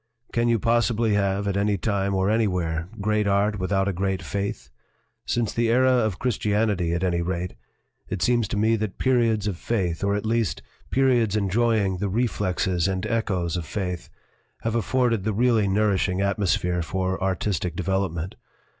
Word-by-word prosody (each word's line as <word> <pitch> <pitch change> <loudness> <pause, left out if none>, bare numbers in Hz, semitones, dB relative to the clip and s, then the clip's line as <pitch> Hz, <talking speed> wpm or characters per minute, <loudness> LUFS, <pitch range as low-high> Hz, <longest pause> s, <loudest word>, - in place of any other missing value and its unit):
"Can 120 0 +2
you 115 -1 +3
possibly 115 0 +2
have, 100 0 0
at 100 - 0
any 100 0 +1
time 100 +1 0
or 95 0 +1
anywhere, 90 -6 0
great 105 0 +1
art 100 +1 +1
without 95 +1 0
a 100 - 0
great 95 +1 -1
faith? 100 -12 -4 0.6
Since 120 -3 0
the 115 0 +1
era 130 +2 +4
of 110 -6 +1
Christianity, 105 -6 0
at 85 +2 -1
any 85 -2 +1
rate, 90 +1 -3 0.6
it 90 - -2
seems 120 -1 +2
to 105 - -3
me 110 +2 +3
that 110 -2 -4
periods 115 -5 +2
of 100 -5 -2
faith, 90 -6 -2
or 100 0 +1
at 105 - -3
least 115 -3 0 0.3
periods 125 -6 +2
enjoying 105 -1 +1
the 100 - -1
reflexes 95 -5 0
and 95 -1 -2
echoes 95 -7 -1
of 85 -3 -4
faith, 90 -4 -4 0.5
have 115 - -1
afforded 115 -1 +1
the 110 +1 0
really 115 -1 +3
nourishing 95 -2 +1
atmosphere 95 -3 +1
for 95 +2 -2
artistic 95 -2 -1
develop 95 0 0
ment. 85 +3 -5
100 Hz, 165 wpm, -24 LUFS, 95-110 Hz, 0.6 s, era